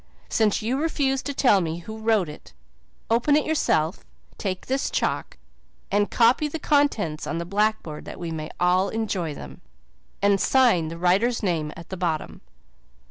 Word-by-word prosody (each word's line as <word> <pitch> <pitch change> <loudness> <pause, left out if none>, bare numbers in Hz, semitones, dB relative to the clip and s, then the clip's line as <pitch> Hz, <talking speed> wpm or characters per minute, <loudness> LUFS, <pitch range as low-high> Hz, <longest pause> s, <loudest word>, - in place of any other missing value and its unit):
Since 215 -1 +1
you 255 +6 0
refuse 275 -4 0
to 285 - -4
tell 245 -8 +4
me 165 -1 -2
who 220 +5 -8
wrote 220 -5 +2
it, 150 - -11 0.6
open 240 +6 +3
it 300 - +2
yourself, 180 - +1 0.4
take 185 -3 -3
this 265 +1 -1
chalk, - - -2 0.5
and 205 0 +2
copy 245 +6 +3
the 300 - -4
contents 285 - +1
on 160 +4 -2
the 170 - -3
blackboard 200 -5 -1
that - - -8
we 170 -1 -4
may 155 -1 -5
all 180 +2 +3
enjoy 190 -9 -2
them. 65 - -10 0.6
And 200 -1 +3
sign 240 -12 +4
the 165 +1 -6
writer's 200 +8 +2
name 160 -6 0
at 170 - -11
the 190 - -5
bottom." 165 -3 -2
200 Hz, 165 wpm, -24 LUFS, 170-240 Hz, 0.6 s, tell